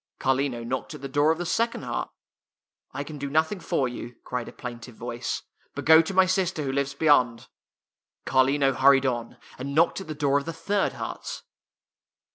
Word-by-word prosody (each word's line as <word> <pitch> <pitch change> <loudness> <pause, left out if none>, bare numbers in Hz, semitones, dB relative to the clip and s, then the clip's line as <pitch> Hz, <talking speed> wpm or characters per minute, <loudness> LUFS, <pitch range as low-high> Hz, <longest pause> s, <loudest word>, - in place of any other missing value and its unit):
Car 135 - +2
lino 130 -3 -2
knocked 130 +2 -4
at - - -11
the 135 - -4
door 145 +3 +3
of 160 - 0
the 175 - -3
second 230 -1 0
hut. 120 -2 -3 0.4
" - - -69 0.3
I 140 +2 -4
can 150 0 -9
do 140 0 -3
nothing 160 +6 +1
for 135 -5 0
you," 120 0 -7
cried 125 -1 -4
a - - -7
plain 120 -2 -7
tive 120 0 -12
voice. 120 +1 -4
" - - -39
But 140 - -5
go 160 +2 +8
to 165 +4 -5
my 190 0 +6
sister 185 -4 0
who 135 - -1
lives 140 0 -1
beyond." 130 -6 +3 0.8
Carlino 135 +1 +3
hurried 135 0 +5
on, 120 -3 -2 0.2
and 140 +2 -4
knocked 165 +4 +3
at 190 - -9
the 155 - -5
door 145 -1 +2
of 140 - -9
the 165 - -4
third 200 +4 0
hut. - - -6
140 Hz, 210 wpm, -26 LUFS, 130-160 Hz, 0.8 s, go